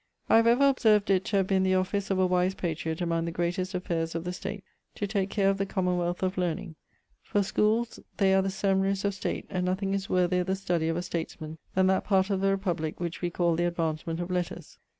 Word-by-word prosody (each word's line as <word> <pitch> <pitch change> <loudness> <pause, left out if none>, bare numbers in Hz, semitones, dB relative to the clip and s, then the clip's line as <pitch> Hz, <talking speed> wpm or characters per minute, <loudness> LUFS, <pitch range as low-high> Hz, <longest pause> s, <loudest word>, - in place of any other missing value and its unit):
I - - +7
have 230 0 +4
ever 250 +4 +5
observ'd 220 -6 +3
it 190 -1 +2
to 205 - 0
have 195 - +3
been 190 0 +2
the 185 0 +2
office 190 +2 -1
of 195 - +1
a 185 - +3
wise 180 +1 +1
patriot 160 -1 -3
among 165 -1 0
the 170 - -3
greatest 175 +3 -2
affaires 165 -2 -2
of 165 - -2
the 180 +1 -4
state 200 +2 -6 0.3
to 205 - -2
take 200 -1 -1
care 200 -1 +1
of 195 0 +2
the 195 - +1
commonwealth 180 -2 -1
of 185 0 -1
learning, 175 0 -2 0.5
for 205 - 0
schooles 215 +3 +1 0.2
they 190 -1 +4
are 190 - +5
the 195 - -1
seminaries 195 0 0
of 200 - +1
state 190 - -3
and 185 -2 -1
nothing 190 +2 -1
is 195 0 -2
worthier 180 0 +2
the 190 +1 -1
study 175 -4 -1
of 165 0 0
a 175 - -2
statesman 160 -2 -5 0.2
then 190 0 +4
that 190 0 +2
part 195 0 +2
of 190 -1 0
the 195 - +3
republick 170 -5 -3
which 175 -1 -4
wee 175 - 0
call 170 -1 +1
the 175 +1 +1
advancement 165 -1 -2
of 175 +1 -4
letters. 180 -2 -4
185 Hz, 235 wpm, -28 LUFS, 175-195 Hz, 0.5 s, I